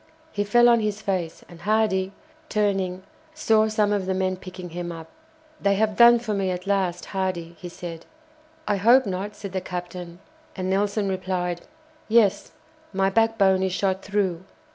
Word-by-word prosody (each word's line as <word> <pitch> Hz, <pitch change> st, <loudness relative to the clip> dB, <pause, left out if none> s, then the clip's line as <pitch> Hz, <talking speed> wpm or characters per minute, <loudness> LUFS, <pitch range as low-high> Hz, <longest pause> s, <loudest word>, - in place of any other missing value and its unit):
He 205 Hz, -, -1 dB
fell 240 Hz, +4 st, +5 dB
on 235 Hz, -1 st, +5 dB
his 210 Hz, -1 st, -2 dB
face, 185 Hz, -6 st, -3 dB
and 170 Hz, -2 st, -14 dB
Hardy, 200 Hz, -2 st, +1 dB, 0.4 s
turning, 195 Hz, -3 st, 0 dB, 0.3 s
saw 220 Hz, -8 st, +3 dB
some 210 Hz, -1 st, +1 dB
of 195 Hz, -2 st, -1 dB
the 190 Hz, -, 0 dB
men 185 Hz, 0 st, 0 dB
picking 185 Hz, -1 st, -9 dB
him 175 Hz, 0 st, -5 dB
up. 165 Hz, -1 st, -9 dB, 0.5 s
"They 200 Hz, 0 st, +3 dB
have 215 Hz, +1 st, +1 dB
done 240 Hz, +1 st, +8 dB
for 230 Hz, -2 st, -3 dB
me 195 Hz, -2 st, 0 dB
at 180 Hz, 0 st, -4 dB
last, 190 Hz, -3 st, 0 dB
Hardy," 180 Hz, -3 st, -2 dB
he 175 Hz, -, -7 dB
said. 170 Hz, -1 st, -8 dB, 0.6 s
"I 205 Hz, -, +1 dB
hope 240 Hz, +6 st, +5 dB
not," 200 Hz, +2 st, -4 dB
said 200 Hz, -2 st, -7 dB
the 190 Hz, 0 st, -2 dB
captain. 175 Hz, -1 st, -6 dB, 0.4 s
And 185 Hz, -1 st, -2 dB
Nelson 200 Hz, +1 st, 0 dB
replied: 185 Hz, -2 st, -2 dB, 0.5 s
"Yes, 215 Hz, -3 st, +3 dB, 0.4 s
my 195 Hz, 0 st, +1 dB
backbone 205 Hz, -3 st, +3 dB
is 190 Hz, -1 st, 0 dB
shot 190 Hz, -1 st, 0 dB
through." 195 Hz, -4 st, -1 dB
190 Hz, 165 wpm, -24 LUFS, 180-210 Hz, 0.6 s, done